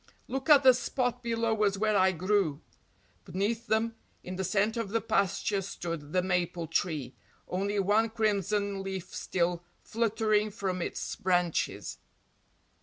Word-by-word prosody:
"Look 265 +3 -4
at 285 -2 +8
the 260 -1 +8
spot 245 0 -1
below 230 -2 0
us 200 -1 +2
where 215 +1 +1
I 190 -1 +5
grew." 185 -4 0 0.6
Beneath 205 +6 -2
them, 220 +1 +1 0.3
in 185 - -6
the 190 - -2
centre 210 +5 +1
of 210 - -6
the 230 +3 +1
pasture, 200 -1 0
stood 165 -5 -5
the 180 +1 +2
maple 180 -2 -1
tree, 155 -5 -1 0.3
only 200 +3 -1
one 205 +3 +3
crimson 205 -2 0
leaf 190 -2 -5
still 175 -1 -1 0.2
fluttering 215 -2 +1
from 190 -3 -3
its - - -3
branches. 180 -3 0
200 Hz, 140 wpm, -29 LUFS, 180-220 Hz, 0.6 s, at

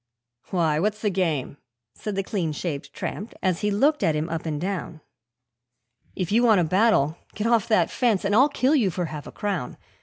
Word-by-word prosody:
'Why, 160 -4 +1
what's 210 +4 0
the 210 -2 0
game?' 160 -7 -1 0.4
said 210 -2 -5
the 195 - -1
clean 180 -6 -2
shaved 145 -3 -4
tramp, 205 +9 -6
as 185 -2 +1
he 210 - +1
looked 280 +9 +2
at 160 - +2
him 155 +2 -2
up 165 0 -4
and 150 -2 -2
down 175 -3 -4 1.1
'If 185 -1 -3
you 230 +3 +4
want 225 -5 +5
a - - +3
battle, 175 -4 +2 0.2
get 210 - -3
off 230 -3 +3
that 185 -7 +2
fence, 225 -6 +1
and 200 - +1
I'll 260 +7 +6
kill 275 0 +1
you 230 -9 +3
for 180 0 -2
half 150 -2 -7
a - - -8
crown! 195 -10 -3
190 Hz, 205 wpm, -24 LUFS, 160-215 Hz, 1.1 s, I'll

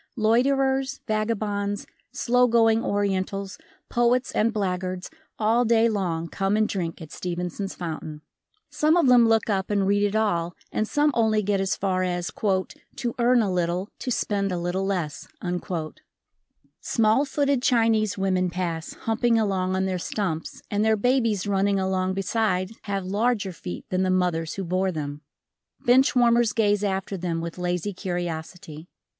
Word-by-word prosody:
Loiterers, 265 +4 +2
vagabonds, 210 -2 -1 0.3
slow 250 0 +2
going 225 -1 +3
Orientals, 195 -1 -1 0.3
poets 240 +1 +1
and 225 +2 +2
blackguards, 185 - -3 0.3
all 225 +3 +3
day 230 -1 +4
long 175 -7 -1
come 195 +4 0
and 215 0 +3
drink 170 -4 -3
at 155 - -12
Stevenson's 180 +2 -4
fountain. 155 -3 -6 0.5
Some 300 +3 +3
of 345 - +4
them 245 -2 +6
look 225 -1 +2
up 195 -3 -1
and 200 -2 +1
read 200 +1 +2
it 205 0 +1
all 175 -6 0 0.2
and 215 - -1
some 295 +4 +2
only 220 -2 +2
get 200 -1 +1
as 190 -1 0
far 185 -2 0
as 180 -1 -2
"to 205 +4 -2
earn 240 0 +4
a 200 - -1
little, 180 +3 -1
to 260 - -4
spend 200 -4 0
a 180 - -1
little 175 +3 -2
less". 175 -7 -3 1.5
Small 225 +3 +2
footed 280 -2 0
Chinese 225 -5 +2
women 185 -2 +1
pass, 170 -2 -3
humping 230 +1 +2
along 190 -4 0
on 190 0 0
their 185 -1 -1
stumps 170 -4 -3
and 205 +1 +1
their 220 0 +3
babies 230 -3 +1
running 200 0 +1
along 190 0 0
beside 195 -1 0
have 195 -2 -2
larger 205 +1 0
feet 90 - -7
than 185 0 +1
the 185 - +1
mothers 175 -3 0
who 195 - -3
bore 185 +2 0
them, 145 -3 -5 0.6
Bench 260 +3 +5
warmers 240 -2 +4
gaze 205 -2 +2
after 195 0 -2
them 170 -2 -2
with 170 +1 -6
lazy 180 +3 -2
curiosity. 175 -2 -5
200 Hz, 155 wpm, -25 LUFS, 185-225 Hz, 1.5 s, them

